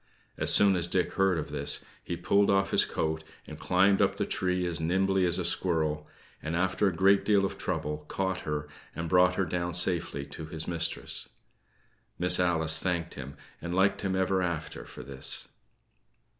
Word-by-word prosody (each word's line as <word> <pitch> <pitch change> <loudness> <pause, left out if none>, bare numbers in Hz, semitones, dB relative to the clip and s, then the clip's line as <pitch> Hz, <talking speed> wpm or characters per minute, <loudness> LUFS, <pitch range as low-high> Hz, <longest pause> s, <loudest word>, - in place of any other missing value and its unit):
As - - +5
soon 100 -1 +6
as 85 -1 0
Dick 90 -1 0
heard 95 -2 +2
of 75 - -5
this, - - +1 0.2
he 85 - -4
pulled 100 +3 +2
off 100 0 +2
his - - +4
coat, 80 0 -2 0.2
and - - -10
climbed 95 +2 +3
up - - +2
the - - -1
tree 90 -1 -1
as 85 -3 -3
nimbly 95 +3 +1
as 85 - +1
a - - -2
squirrel; 75 -2 0 0.3
and, 80 +1 -3
after 95 +3 +1
a - - +2
great 95 +3 +3
deal 100 -2 +3
of - - -5
trouble, 75 0 -3
caught 95 -1 -2
her 75 -1 -4 0.3
and 85 0 -4
brought 90 +1 +4
her 95 - 0
down 85 0 -3
safely 85 -5 -1
to 75 +3 -9
his 80 0 -5
mistress. 85 -7 -1 0.9
Miss 90 +1 +3
Alice 80 -3 +1
thanked 85 -2 -2
him, 70 0 -9 0.2
and 85 +1 -4
liked 95 +1 +2
him 95 -1 -1
ever 95 0 +1
after 85 -3 -4
for - - -11
this. 70 -1 -2
90 Hz, 185 wpm, -28 LUFS, 80-95 Hz, 0.9 s, soon